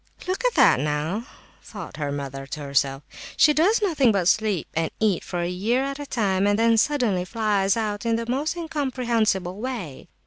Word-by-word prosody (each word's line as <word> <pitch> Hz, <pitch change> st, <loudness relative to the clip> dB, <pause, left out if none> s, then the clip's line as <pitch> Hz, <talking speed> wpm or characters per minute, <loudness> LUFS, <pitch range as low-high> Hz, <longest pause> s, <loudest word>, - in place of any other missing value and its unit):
"Look 375 Hz, +6 st, -2 dB
at -, -, +2 dB
that, 265 Hz, -, +5 dB
now," 150 Hz, -, -2 dB, 0.4 s
thought 200 Hz, -7 st, -9 dB
the 150 Hz, -1 st, -3 dB
mother 135 Hz, -1 st, -5 dB
to 150 Hz, -, -6 dB
herself, 140 Hz, 0 st, 0 dB, 0.3 s
"she 300 Hz, -, +6 dB
does 400 Hz, +9 st, +3 dB
nothing 290 Hz, -, +3 dB
but 190 Hz, -4 st, 0 dB
sleep 210 Hz, -3 st, +1 dB
and 165 Hz, 0 st, 0 dB
eat 210 Hz, -5 st, +1 dB
for 175 Hz, -, -4 dB
a 170 Hz, -, -1 dB
year 215 Hz, +9 st, 0 dB
at 275 Hz, +1 st, -4 dB
a 290 Hz, -, -6 dB
time, 200 Hz, -5 st, +1 dB
and 205 Hz, 0 st, +2 dB
then 230 Hz, 0 st, +4 dB
suddenly 235 Hz, -10 st, +1 dB
flies 205 Hz, 0 st, 0 dB
out 210 Hz, -1 st, -2 dB
in 230 Hz, -1 st, +1 dB
the 230 Hz, 0 st, -2 dB
most 285 Hz, +7 st, -1 dB
incomprehensible 240 Hz, -, -1 dB
way!" 230 Hz, -, -5 dB
215 Hz, 185 wpm, -24 LUFS, 175-260 Hz, 0.4 s, she